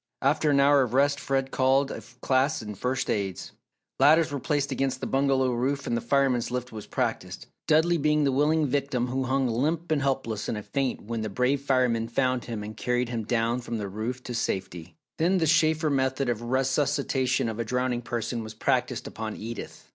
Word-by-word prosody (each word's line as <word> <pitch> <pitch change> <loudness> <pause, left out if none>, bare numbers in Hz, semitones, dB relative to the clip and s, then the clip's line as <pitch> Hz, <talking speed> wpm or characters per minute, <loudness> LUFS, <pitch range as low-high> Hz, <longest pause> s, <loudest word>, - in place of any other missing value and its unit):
After 150 +3 +2
an 140 -1 +4
hour 140 0 +5
of 125 -1 -1
rest, 140 +1 +3
Fred 135 -1 -1
called 135 +1 +2
a - - -6 0.2
class 135 +1 +1
in 105 -1 -6
First 125 +5 -2
Aids. 100 -3 -2 0.5
Ladders 160 +1 +5
were 140 - -2
placed 145 +1 -1
against 135 -1 -1
the - - -4
bungalow 135 -1 +2
roof 135 +4 -1
and 120 - -1
the 115 - -1
Fireman's 135 -4 +1
Lift 125 0 -4
was 110 -2 -8
practised - - -3 0.2
Dudley 160 +2 +3
being 150 +1 +2
the 140 - +2
willing 150 +3 +2
victim 135 -3 -1
who 130 +1 -1
hung 135 +1 +1
limp 155 +8 -1
and 150 -3 +2
helpless 130 -6 -1
in - - -1
a 105 - -6
faint 135 +1 -2
when 115 +1 -4
the 110 - -3
brave 125 +6 +1
fireman 125 -4 +1
found 125 +1 0
him 115 -3 -5
and 105 +1 -7
carried 125 +2 -1
him 115 -3 -3
down 115 +1 0
from 120 -1 -4
the 105 -2 -4
roof 115 +6 -4
to 125 - -6
safety. 90 -7 -3 0.2
Then 180 +4 +3
the 165 - +2
Shaefer 155 -1 +3
method 130 -1 0
of 115 -2 -1
resuscitation 130 0 0
of 110 0 -4
a - - +1
drowning 125 +1 -1
person 120 0 -3
was 110 0 -9
practised - - 0
upon 110 -1 -5
Edith. 115 +2 -8
130 Hz, 200 wpm, -27 LUFS, 115-140 Hz, 0.5 s, hour